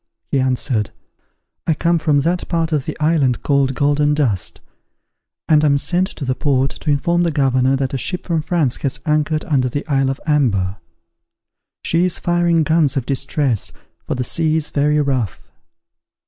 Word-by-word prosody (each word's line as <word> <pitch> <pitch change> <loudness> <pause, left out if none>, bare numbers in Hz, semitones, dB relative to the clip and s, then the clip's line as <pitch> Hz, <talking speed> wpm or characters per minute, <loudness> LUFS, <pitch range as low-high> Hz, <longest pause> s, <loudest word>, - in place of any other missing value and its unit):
He 140 - +2
answered, 125 -4 0 0.8
"I 160 - +2
come 170 +2 +1
from 150 -2 +2
that 175 +4 -1
part 165 -1 0
of 150 -4 0
the - - -6
island 150 -5 +1
called 140 -2 +1
Golden 145 +1 +2
Dust; 120 -12 0 0.9
and 155 -1 +4
am 145 -2 +4
sent 180 +6 0
to 150 - -7
the 130 - 0
port, 135 -1 0
to 150 - -5
inform 170 +5 +1
the 175 - +2
governor 135 -3 +2
that 135 -1 -2
a 135 - -1
ship 180 +8 -3
from 165 -3 0
France 155 -5 0
has 140 - -3
anchored 155 0 0
under 130 -5 +1
the 145 +4 -4
Isle 135 -3 +1
of 135 - -3
Amber. 105 - +1 1.1
She 170 +1 +1
is 180 - 0
firing 175 -1 +1
guns 155 -3 +2
of 130 - -1
distress, 135 -3 -1 0.4
for - - -1
the 125 - -2
sea 155 +5 +1
is 150 -2 -2
very 150 +1 +2
rough." 130 - -2
145 Hz, 175 wpm, -19 LUFS, 135-160 Hz, 1.1 s, and